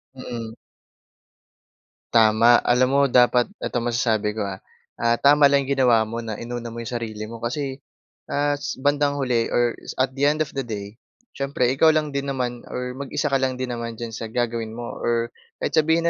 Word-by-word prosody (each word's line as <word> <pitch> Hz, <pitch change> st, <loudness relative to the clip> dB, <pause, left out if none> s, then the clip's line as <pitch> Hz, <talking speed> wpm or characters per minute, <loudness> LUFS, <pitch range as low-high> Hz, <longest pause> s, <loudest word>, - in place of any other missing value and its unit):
Mm. 115 Hz, -3 st, -6 dB, 1.6 s
Tama. 115 Hz, +1 st, +6 dB
Alam 125 Hz, +1 st, +4 dB
mo 140 Hz, 0 st, +4 dB
dapat 125 Hz, -1 st, +4 dB, 0.2 s
eto 120 Hz, -, -1 dB
masasabi 115 Hz, -3 st, 0 dB
ko 105 Hz, -, -2 dB
ha, 95 Hz, -1 st, -5 dB, 0.4 s
ah, 115 Hz, 0 st, +3 dB
tama 145 Hz, +2 st, +6 dB
lang 140 Hz, 0 st, +3 dB
'yong 135 Hz, 0 st, -2 dB
ginawa 120 Hz, -3 st, +5 dB
mo 115 Hz, +2 st, -5 dB
na 110 Hz, -2 st, -5 dB
inuna 120 Hz, 0 st, -6 dB
mo 115 Hz, 0 st, -6 dB
'yong 120 Hz, -, -6 dB
sarili 110 Hz, -2 st, -5 dB
mo, 115 Hz, +1 st, -8 dB
kasi, 135 Hz, +3 st, -3 dB, 0.5 s
as, 145 Hz, 0 st, -1 dB
bandang 145 Hz, +1 st, +1 dB
huli, 125 Hz, -4 st, +1 dB
or 120 Hz, -1 st, +2 dB, 0.2 s
at 130 Hz, 0 st, +1 dB
the 140 Hz, +2 st, +1 dB
end 155 Hz, +1 st, +2 dB
of 140 Hz, -, -11 dB
the 135 Hz, -, -4 dB
day, 105 Hz, -2 st, -7 dB, 0.3 s
siyempre 140 Hz, -3 st, 0 dB
ikaw 145 Hz, +4 st, +4 dB
lang 150 Hz, -1 st, 0 dB
din 140 Hz, 0 st, -3 dB
naman 125 Hz, -3 st, -2 dB
or 125 Hz, 0 st, -4 dB
mag-isa 140 Hz, +1 st, -2 dB
ka 135 Hz, -, +3 dB
lang 130 Hz, -1 st, 0 dB
din 125 Hz, -1 st, -4 dB
naman 115 Hz, -1 st, -4 dB
diyan 115 Hz, 0 st, -6 dB
sa 115 Hz, 0 st, -5 dB
gagawin 115 Hz, -1 st, -2 dB
mo 120 Hz, 0 st, -6 dB
or 120 Hz, 0 st, 0 dB, 0.3 s
kahit -, -, 0 dB
sabihin 160 Hz, +2 st, +3 dB
120 Hz, 185 wpm, -23 LUFS, 115-140 Hz, 1.6 s, Tama